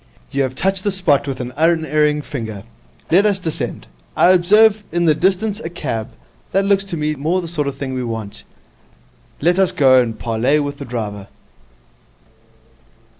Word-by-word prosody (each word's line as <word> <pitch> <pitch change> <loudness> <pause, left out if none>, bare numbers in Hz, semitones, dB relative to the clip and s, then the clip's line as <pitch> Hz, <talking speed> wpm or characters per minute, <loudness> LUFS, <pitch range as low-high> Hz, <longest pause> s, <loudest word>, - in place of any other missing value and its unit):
'You 140 - 0
have 130 -1 -2
touched 195 +3 0
the 205 - +1
spot 180 -8 +1
with 135 -2 -4
an 125 0 -6
unerring 155 -2 +1
finger. 110 -9 -6 0.5
Let 195 +5 +5
us 200 -2 +1
descend. 165 -4 -4 0.3
I - - +5
observe 210 +4 +4
in 175 +1 0
the 155 - +5
distance 195 +5 0
a 165 - -6
cab. 115 -9 -4 0.4
That 195 +1 +2
looks 200 -1 +2
to 185 -4 -5
me 150 0 -1
more 155 +6 -1
the 175 - -5
sort 155 -4 -2
of 140 - -4
thing 135 -2 -4
we 130 -1 -3
want. 115 -3 -5 1.0
Let 175 +5 +2
us 190 -2 +3
go 130 -3 +5
and 115 -2 -3
parley 120 +6 +1
with 145 -1 -4
the 140 - -6
driver.' 105 -5 -5
150 Hz, 175 wpm, -18 LUFS, 130-185 Hz, 1.0 s, Let